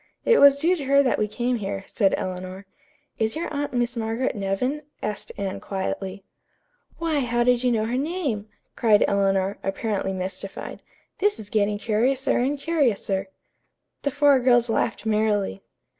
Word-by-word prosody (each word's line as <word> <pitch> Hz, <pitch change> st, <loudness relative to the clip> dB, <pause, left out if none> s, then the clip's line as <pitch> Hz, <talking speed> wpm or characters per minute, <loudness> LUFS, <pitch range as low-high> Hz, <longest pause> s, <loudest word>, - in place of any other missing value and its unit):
It 470 Hz, -, +5 dB
was 280 Hz, 0 st, +8 dB
due 340 Hz, +5 st, +3 dB
to 285 Hz, -, -5 dB
her 280 Hz, +1 st, +5 dB
that 255 Hz, -, +1 dB
we 215 Hz, -, +1 dB
came 240 Hz, +3 st, -1 dB
here," 195 Hz, -2 st, -4 dB
said 200 Hz, -4 st, +1 dB
Eleanor. 185 Hz, +1 st, -5 dB, 0.5 s
"Is 220 Hz, +2 st, 0 dB
your 320 Hz, -1 st, -4 dB
aunt 285 Hz, 0 st, -2 dB
Miss 240 Hz, 0 st, -1 dB
Margaret 230 Hz, +3 st, -1 dB
Nevin?" 210 Hz, +9 st, -1 dB, 0.2 s
asked 210 Hz, -, -4 dB
Anne 195 Hz, -1 st, -3 dB
quietly. 195 Hz, 0 st, -4 dB, 0.7 s
"Why, 325 Hz, -3 st, 0 dB
how 240 Hz, -2 st, +1 dB
did 245 Hz, 0 st, +3 dB
you 250 Hz, -, +3 dB
know 220 Hz, -2 st, +1 dB
her 240 Hz, +3 st, -1 dB
name?" 280 Hz, -, -2 dB, 0.3 s
cried 215 Hz, -3 st, +4 dB
Eleanor, 195 Hz, 0 st, +1 dB
apparently 195 Hz, 0 st, -2 dB
mystified. 190 Hz, +1 st, -6 dB, 0.4 s
"'This 415 Hz, +1 st, +2 dB
is 210 Hz, -2 st, -9 dB
getting 205 Hz, -1 st, +1 dB
curiouser 245 Hz, +6 st, +1 dB
and 270 Hz, +4 st, 0 dB
curiouser.'" 235 Hz, -11 st, 0 dB, 0.7 s
The 285 Hz, -, 0 dB
four 285 Hz, -1 st, +4 dB
girls 240 Hz, -2 st, +3 dB
laughed 225 Hz, 0 st, -1 dB
merrily. 210 Hz, -2 st, +1 dB
225 Hz, 160 wpm, -24 LUFS, 200-270 Hz, 0.7 s, was